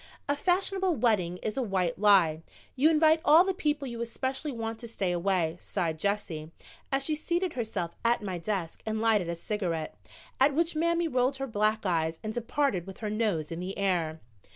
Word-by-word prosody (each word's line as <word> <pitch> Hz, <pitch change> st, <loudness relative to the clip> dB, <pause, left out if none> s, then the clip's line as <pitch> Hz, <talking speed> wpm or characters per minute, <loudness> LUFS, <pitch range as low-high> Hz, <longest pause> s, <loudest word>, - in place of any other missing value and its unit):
"A 285 Hz, -, +1 dB
fashionable 370 Hz, +2 st, +1 dB
wedding 210 Hz, -8 st, +1 dB
is 215 Hz, -, -2 dB
a -, -, +1 dB
white 185 Hz, -7 st, -1 dB
lie; 185 Hz, -7 st, +5 dB, 0.3 s
you 285 Hz, +5 st, +4 dB
invite 315 Hz, 0 st, +4 dB
all 325 Hz, +1 st, +7 dB
the 385 Hz, 0 st, 0 dB
people 295 Hz, -5 st, -1 dB
you 235 Hz, -1 st, -5 dB
especially 265 Hz, +5 st, -3 dB
want 225 Hz, -2 st, -4 dB
to 235 Hz, -, -7 dB
stay 195 Hz, -5 st, -1 dB
away," 175 Hz, -2 st, 0 dB
sighed 165 Hz, -5 st, -2 dB
Jessie, 180 Hz, -6 st, -2 dB, 0.4 s
as 270 Hz, 0 st, +1 dB
she 310 Hz, -, +1 dB
seated 345 Hz, +3 st, -1 dB
herself 200 Hz, -8 st, -3 dB
at 235 Hz, -1 st, +2 dB
my 185 Hz, -3 st, -3 dB
desk 175 Hz, -2 st, -3 dB
and 220 Hz, 0 st, -2 dB
lighted 215 Hz, -6 st, +2 dB
a 170 Hz, -, -2 dB
cigarette, 170 Hz, -4 st, -3 dB, 0.4 s
at 275 Hz, +1 st, +4 dB
which 335 Hz, +1 st, +1 dB
Mammy 335 Hz, +1 st, +1 dB
rolled 255 Hz, -1 st, +1 dB
her 270 Hz, 0 st, -3 dB
black 215 Hz, -2 st, 0 dB
eyes 160 Hz, -3 st, 0 dB
and 215 Hz, 0 st, -3 dB
departed 240 Hz, -, -1 dB
with 195 Hz, -, -8 dB
her 215 Hz, -3 st, -4 dB
nose 205 Hz, -9 st, -1 dB
in 165 Hz, -, -4 dB
the 185 Hz, +2 st, -5 dB
air. 170 Hz, -5 st, 0 dB
220 Hz, 190 wpm, -29 LUFS, 180-275 Hz, 0.4 s, all